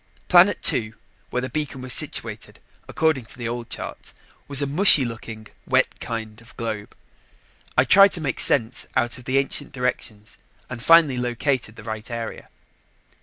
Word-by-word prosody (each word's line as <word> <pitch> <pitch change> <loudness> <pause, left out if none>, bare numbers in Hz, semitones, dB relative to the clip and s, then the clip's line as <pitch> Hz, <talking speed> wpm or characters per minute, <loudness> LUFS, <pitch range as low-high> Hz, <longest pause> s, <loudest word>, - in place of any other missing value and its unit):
Planet 180 +3 +5
two, 110 -2 +3 0.3
where 125 - -2
the 130 - -4
beacon 145 -1 -4
was 130 - +2
situated - - -2 0.3
according 155 -6 0
to 115 - -12
the 120 -2 -4
old 120 0 -5
charts, - - -8 0.3
was 140 -1 +2
a - - +1
mushy 145 -1 +5
looking, 115 -1 -8 0.2
wet - - +1
kind 110 -1 -6
of 115 -1 -18
globe. 110 -3 -5 0.8
I - - +6
tried 195 0 +6
to - - +1
make 135 -6 -3
sense 120 -3 0
out 120 +2 0
of 125 - -15
the 130 +2 0
ancient 140 +1 -1
directions 115 -4 -4 0.3
and 125 -2 -6
finally 160 -2 +5
located 125 -1 -2
the 110 - -12
right 110 0 -6
area. 115 -1 -6
125 Hz, 165 wpm, -23 LUFS, 115-140 Hz, 0.8 s, I